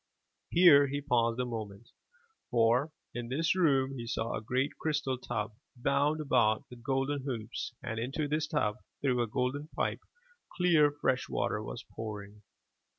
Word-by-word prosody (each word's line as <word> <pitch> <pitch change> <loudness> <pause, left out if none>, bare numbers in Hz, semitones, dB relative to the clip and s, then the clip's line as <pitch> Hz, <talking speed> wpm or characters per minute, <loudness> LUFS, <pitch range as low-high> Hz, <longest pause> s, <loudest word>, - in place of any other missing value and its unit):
Here 160 -5 +7
he 140 +1 -2
paused 120 -4 +1
a 125 - +1
moment, 110 -2 -6 0.6
for, 120 +5 +3 0.2
in 120 0 -5
this 160 +6 +1
room 135 -7 +3
he 115 - -5
saw 115 0 -2
a - - -3
great 130 +5 0
crystal 145 -4 0
tub, 105 -3 -3 0.2
bound 140 +4 +1
about 120 -7 +2
with 120 -1 -11
golden 135 +2 0
hoops, 120 -6 -4
and 115 - -3
into 135 +6 -2
this 150 +1 0
tub 125 -9 0 0.3
through 125 -3 +2
a 120 - 0
golden 130 +6 -1
pipe, - - -1 0.6
clear, 170 -5 +5
fresh 145 -3 0
water - - -1
was - - -6
pouring. 105 -2 -8
130 Hz, 155 wpm, -31 LUFS, 115-145 Hz, 0.6 s, Here